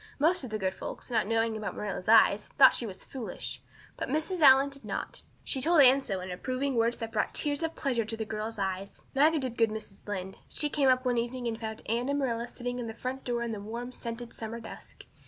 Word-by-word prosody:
Most 320 Hz, +3 st, +2 dB
of 255 Hz, -, -5 dB
the 215 Hz, -, -2 dB
good 190 Hz, -2 st, -1 dB
folks, -, -, -7 dB
not 220 Hz, -4 st, +2 dB
knowing 225 Hz, 0 st, +1 dB
about 215 Hz, -1 st, -4 dB
Marilla's 195 Hz, -3 st, -4 dB
eyes, 220 Hz, -2 st, +6 dB
thought 265 Hz, -2 st, +9 dB
she 235 Hz, -, -1 dB
was 190 Hz, -2 st, -9 dB
foolish. 255 Hz, -5 st, -6 dB, 0.4 s
Mrs. 315 Hz, +7 st, -1 dB
Allan 270 Hz, -1 st, +8 dB
did 275 Hz, 0 st, -11 dB
not. -, -, -5 dB, 0.2 s
She 265 Hz, -, -2 dB
told 320 Hz, +1 st, +6 dB
Anne 265 Hz, +2 st, +7 dB
so 195 Hz, -8 st, -3 dB
in 185 Hz, 0 st, -6 dB
approving 255 Hz, +8 st, -2 dB
words 230 Hz, 0 st, +2 dB
that 225 Hz, -1 st, -5 dB
brought 215 Hz, -, -1 dB
tears 290 Hz, 0 st, -1 dB
of 325 Hz, 0 st, -2 dB
pleasure 250 Hz, -6 st, 0 dB
to 225 Hz, +1 st, -5 dB
the 220 Hz, -, -3 dB
girl's 215 Hz, +1 st, -4 dB
eyes. 195 Hz, 0 st, -4 dB
Neither 305 Hz, +4 st, +4 dB
did 255 Hz, -5 st, -3 dB
good 225 Hz, -1 st, +5 dB
Mrs. 215 Hz, -2 st, -8 dB
Lynde. 190 Hz, -2 st, -4 dB
She 295 Hz, -, 0 dB
came 280 Hz, -3 st, +3 dB
up 255 Hz, 0 st, +3 dB
one 245 Hz, -1 st, +2 dB
evening 240 Hz, +1 st, -3 dB
and 225 Hz, -1 st, -3 dB
found 220 Hz, 0 st, -5 dB
Anne 235 Hz, +4 st, -1 dB
and 285 Hz, -, +1 dB
Marilla 240 Hz, -4 st, -1 dB
sitting 245 Hz, 0 st, -5 dB
at 240 Hz, -, -4 dB
the 225 Hz, -, -6 dB
front 255 Hz, +3 st, -4 dB
door 240 Hz, -1 st, -1 dB
in 235 Hz, -, -3 dB
the 210 Hz, -2 st, -4 dB
warm, 235 Hz, +4 st, -5 dB
scented 235 Hz, -1 st, -6 dB
summer 225 Hz, +1 st, -6 dB
dusk. -, -, -11 dB
235 Hz, 235 wpm, -29 LUFS, 220-265 Hz, 0.4 s, thought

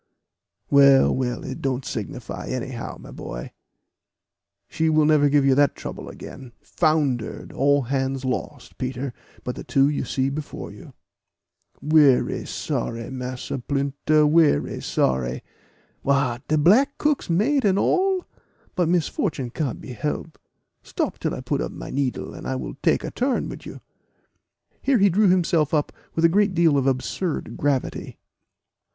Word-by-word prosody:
"Well, 140 Hz, -1 st, +6 dB
well, 125 Hz, -2 st, -2 dB
it 130 Hz, -, -6 dB
don't 130 Hz, -1 st, -2 dB
signify 120 Hz, +1 st, -5 dB
now, 130 Hz, -1 st, -4 dB
my -, -, -12 dB
boy; -, -, -7 dB, 1.2 s
she 160 Hz, 0 st, 0 dB
will 155 Hz, -1 st, +4 dB
never 150 Hz, -1 st, +4 dB
give 140 Hz, -1 st, +3 dB
you 135 Hz, -, +5 dB
that 145 Hz, +1 st, +3 dB
trouble -, -, -7 dB
again 130 Hz, -3 st, -10 dB
foundered 150 Hz, -8 st, 0 dB
all 140 Hz, +1 st, +2 dB
hands 135 Hz, +1 st, -2 dB
lost, 130 Hz, -, -4 dB
Peter, 130 Hz, 0 st, -3 dB, 0.3 s
but 125 Hz, -, -3 dB
the -, -, -7 dB
two 135 Hz, -1 st, +3 dB
you 150 Hz, -, -1 dB
see 135 Hz, 0 st, -1 dB
before 150 Hz, +1 st, -6 dB
you." -, -, -13 dB, 0.9 s
"Werry 150 Hz, -4 st, +4 dB
sorry, 115 Hz, +1 st, -3 dB
Massa 130 Hz, 0 st, -5 dB
Plinter, 140 Hz, +3 st, +1 dB
werry 155 Hz, -, +3 dB
sorry 65 Hz, -1 st, 0 dB, 0.6 s
What! 135 Hz, -3 st, 0 dB
de 155 Hz, -, +2 dB
black 220 Hz, -, +4 dB
cook's 295 Hz, -8 st, 0 dB
mate 245 Hz, -, +2 dB
and 195 Hz, -2 st, +3 dB
all? 375 Hz, -, +2 dB, 0.5 s
But 175 Hz, -4 st, +1 dB
misfortune 155 Hz, -6 st, -1 dB
can't 140 Hz, -3 st, -3 dB
be 125 Hz, -, -8 dB
help. 150 Hz, +5 st, -4 dB, 0.4 s
Stop -, -, -3 dB
till -, -, -2 dB
I -, -, -6 dB
put -, -, -1 dB
up -, -, -3 dB
my -, -, -8 dB
needle, 135 Hz, -2 st, -2 dB
and -, -, -8 dB
I 130 Hz, -, -1 dB
will 130 Hz, -, -5 dB
take -, -, +2 dB
a -, -, -4 dB
turn 255 Hz, +1 st, 0 dB
wid -, -, -9 dB
you." -, -, -9 dB, 1.0 s
Here 270 Hz, -1 st, +3 dB
he 200 Hz, -1 st, +5 dB
drew 200 Hz, +2 st, +4 dB
himself 165 Hz, -4 st, +2 dB
up 150 Hz, -, 0 dB, 0.2 s
with 165 Hz, -, +3 dB
a 165 Hz, -, +4 dB
great 200 Hz, -2 st, +3 dB
deal 165 Hz, -3 st, +4 dB
of 135 Hz, -1 st, +2 dB
absurd 140 Hz, +6 st, -2 dB
gravity. 140 Hz, -3 st, -2 dB
140 Hz, 150 wpm, -23 LUFS, 130-165 Hz, 1.2 s, Well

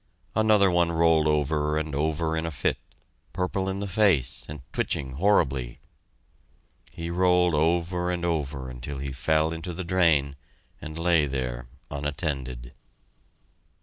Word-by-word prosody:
Another 105 Hz, -3 st, +4 dB
one 85 Hz, -1 st, +2 dB
rolled 80 Hz, -1 st, +3 dB
over 75 Hz, 0 st, +1 dB
and 80 Hz, -1 st, -3 dB
over 80 Hz, +2 st, 0 dB
in 80 Hz, -, -1 dB
a -, -, -1 dB
fit, 75 Hz, -, -1 dB, 0.5 s
purple 95 Hz, +1 st, -1 dB
in 95 Hz, +1 st, -3 dB
the 100 Hz, -, -3 dB
face, 95 Hz, -, +2 dB
and 75 Hz, -2 st, -8 dB
twitching 65 Hz, -, -2 dB
horribly. 65 Hz, -10 st, +1 dB, 1.1 s
He 85 Hz, 0 st, -6 dB
rolled 90 Hz, -1 st, +3 dB
over 85 Hz, +3 st, +1 dB
and 90 Hz, -1 st, -2 dB
over 75 Hz, -5 st, -2 dB
until 65 Hz, +3 st, -6 dB
he 70 Hz, 0 st, -4 dB
fell 80 Hz, +4 st, +1 dB
into 80 Hz, +1 st, -6 dB
the 95 Hz, -, -4 dB
drain, 80 Hz, -6 st, +2 dB, 0.5 s
and 80 Hz, +1 st, -7 dB
lay 85 Hz, -3 st, +3 dB
there, 60 Hz, -3 st, -4 dB, 0.2 s
unattended. 70 Hz, -4 st, -4 dB
80 Hz, 135 wpm, -26 LUFS, 70-90 Hz, 1.1 s, Another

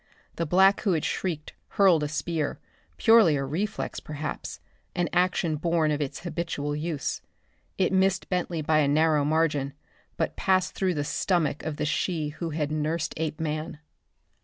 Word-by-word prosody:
The 170 Hz, -, -1 dB
black 190 Hz, +4 st, +5 dB
who 195 Hz, -, +2 dB
had 160 Hz, -, 0 dB
shrieked 165 Hz, -5 st, -3 dB, 0.2 s
hurled 185 Hz, -6 st, +6 dB
a 150 Hz, -, 0 dB
spear, 155 Hz, 0 st, -2 dB, 0.4 s
purely 225 Hz, -9 st, +6 dB
a 135 Hz, -, -1 dB
reflex, 180 Hz, +10 st, -3 dB
perhaps 155 Hz, 0 st, -6 dB, 0.4 s
an 175 Hz, -1 st, +1 dB
action 180 Hz, -3 st, +1 dB
born 165 Hz, -1 st, +1 dB
of 150 Hz, 0 st, -1 dB
its 140 Hz, -1 st, -4 dB
habitual 170 Hz, -4 st, -3 dB
use. 155 Hz, -1 st, -3 dB, 0.6 s
It 190 Hz, 0 st, +1 dB
missed 190 Hz, 0 st, +2 dB
Bentley 175 Hz, -3 st, -1 dB
by 155 Hz, +1 st, +3 dB
a 145 Hz, -, +3 dB
narrow 155 Hz, 0 st, +3 dB
margin, 150 Hz, -2 st, +1 dB, 0.4 s
but -, -, -1 dB
passed 185 Hz, -1 st, +1 dB
through 185 Hz, -2 st, 0 dB
the 145 Hz, -, -1 dB
stomach 160 Hz, -1 st, 0 dB
of 155 Hz, -2 st, -4 dB
the 150 Hz, -, -1 dB
she 155 Hz, 0 st, -1 dB
who 165 Hz, +3 st, -5 dB
had 150 Hz, -1 st, -2 dB
nursed 155 Hz, +1 st, -1 dB
Apeman. 155 Hz, 0 st, -3 dB
160 Hz, 160 wpm, -27 LUFS, 150-180 Hz, 0.6 s, hurled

